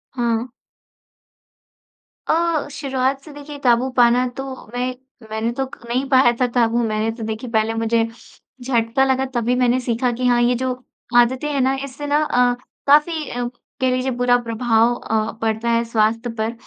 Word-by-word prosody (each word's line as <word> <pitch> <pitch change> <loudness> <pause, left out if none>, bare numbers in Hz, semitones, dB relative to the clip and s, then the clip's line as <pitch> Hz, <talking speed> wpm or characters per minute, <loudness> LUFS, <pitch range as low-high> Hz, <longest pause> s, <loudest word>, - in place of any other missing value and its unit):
हाँ। 235 -1 0 1.8
अ, 330 -1 +1
शुरुआत 270 -1 -1
से 305 - -12
देखिए 290 0 -9
क़ाबू 245 +1 +3
पाना 245 +1 +5
तो 270 - -3 0.3
मैं 250 +1 -1 0.4
मैंने 220 +2 -1
तो 270 - +1
क - - -13
नहीं 255 +3 0
पाया 260 -3 +5
था 250 - +4
था। 240 - +5
वो 235 - 0
मैंने 220 0 0
तो 230 - -7
देखिए 220 +2 -4
पहले 220 0 +1
मुझे 225 0 +1 0.6
झटका 240 0 +1
लगा, 265 0 +1
तभी 245 -1 -1
मैंने 250 0 +2
सीखा 245 0 0
कि 250 +2 -3
हाँ, 240 -1 +3
ये 245 +1 +3
जो 260 +1 -1 0.5
आदतें 255 +4 +3
हैं 280 -2 0
ना, 265 +1 +2
इससे 275 +2 -7
ना 290 +1 +2
अ, 245 -3 +2 0.3
काफ़ी 300 +2 +3
अ, 245 0 -3 0.4
कह 260 - +3
लीजिए 255 +1 -1
बुरा 245 0 +3
प्रभाव 230 0 +2
अ, 220 -2 -1
पड़ता 225 +1 -1
है 230 0 +2
स्वास्थ्य 225 +1 +1
पर। 220 +1 -1
245 Hz, 175 wpm, -20 LUFS, 230-265 Hz, 1.8 s, पाना